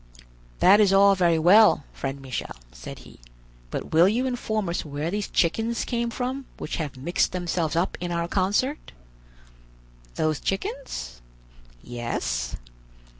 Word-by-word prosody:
"That 200 +3 +7
is 205 -3 +5
all 200 +1 +6
very 175 -3 +3
well, 185 +1 +6
friend 135 0 -4
Michel," 130 -3 -5 0.2
said - - -9
he, - - -15 0.5
"but - - -5
will 170 +4 +6
you 240 +5 0
inform 220 -5 -2
us 170 - -2
where 150 +2 -4
these 205 +1 -2
chickens 225 +7 0
came 235 -1 -1
from 255 +3 -4
which - - -4
have 145 -5 -4
mixed 170 +8 0
themselves 175 -3 -1
up 170 +3 -1
in 175 -1 -3
our 170 0 -1
concert?" 205 - -1 1.2
"Those 155 -2 0
chickens?" 190 - -4 0.6
"Yes." 65 - -3
175 Hz, 135 wpm, -25 LUFS, 150-215 Hz, 1.2 s, That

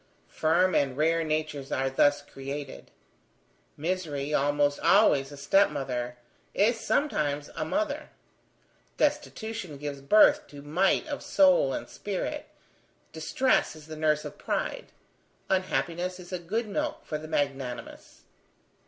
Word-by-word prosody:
Firm 175 +4 +2
and 135 -2 +1
rare 165 +2 +2
natures 155 -3 -2
are 135 0 0
thus 145 +2 +3
created; 140 0 -7 0.9
misery, 150 -4 -2
almost 145 0 +2
always 145 -9 +4
a 145 - -9
step 195 +8 +4
mother, 125 -4 -4 0.4
is 225 +3 +3
sometimes 150 - 0
a - - -2
mother; 315 +2 -2 0.9
destitution 225 - -2
gives 140 -1 -5
birth 210 +10 +5
to 145 -1 -11
might 175 +7 +2
of 290 -3 -5
soul 275 - +4
and - - -4
spirit; 200 -2 -4 0.7
distress 160 +8 +1
is 155 -1 -13
the 155 0 -8
nurse 155 -1 +1
of - - -8
pride; - - -3 0.6
unhappiness 185 -1 -1
is 180 +1 -10
a 180 - -2
good 215 +7 -2
milk 300 +9 -3
for 150 - -3
the 155 - -8
magnanimous. 135 -5 -4
155 Hz, 125 wpm, -28 LUFS, 145-190 Hz, 0.9 s, birth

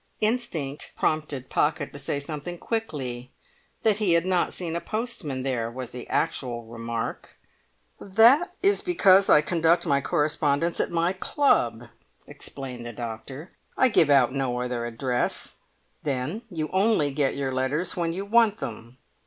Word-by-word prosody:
Instinct 175 - -1
prompted 150 -4 -1
Pocket 150 +1 0
to 145 - -7
say 145 0 -2
something 150 +4 -6
quickly; 135 - -4 0.5
that 215 -3 +3
he 205 -5 +2
had 170 +1 +3
not 185 -2 +1
seen 170 -2 -4
a 170 - -2
postman 215 - -3
there, 125 -4 -1
was 125 +1 -7
the 125 -1 -8
actual 120 -3 -1
remark. 115 0 -5 0.6
"That 235 - +5
is 400 +1 +4
because 195 - +4
I 150 - +7
conduct 165 +1 +2
my 140 -1 +2
correspondence 150 +3 +1
at - - +1
my 170 +1 +1
club," 120 - +1 0.4
explained 130 -3 -7
the 120 0 -7
doctor. 120 - -7 0.3
"I 260 - +5
give 165 -9 +4
out 135 -3 +5
no 130 -3 -1
other 125 -1 -2
address; 125 +1 -2 0.4
then 145 - -2
you 155 -5 -4
only 190 -7 +3
get 140 -1 0
your 135 -2 -2
letters 135 +7 0
when 170 -2 -1
you 190 +4 -4
want 225 0 +4
them." 120 -2 -7
150 Hz, 150 wpm, -26 LUFS, 125-185 Hz, 0.6 s, I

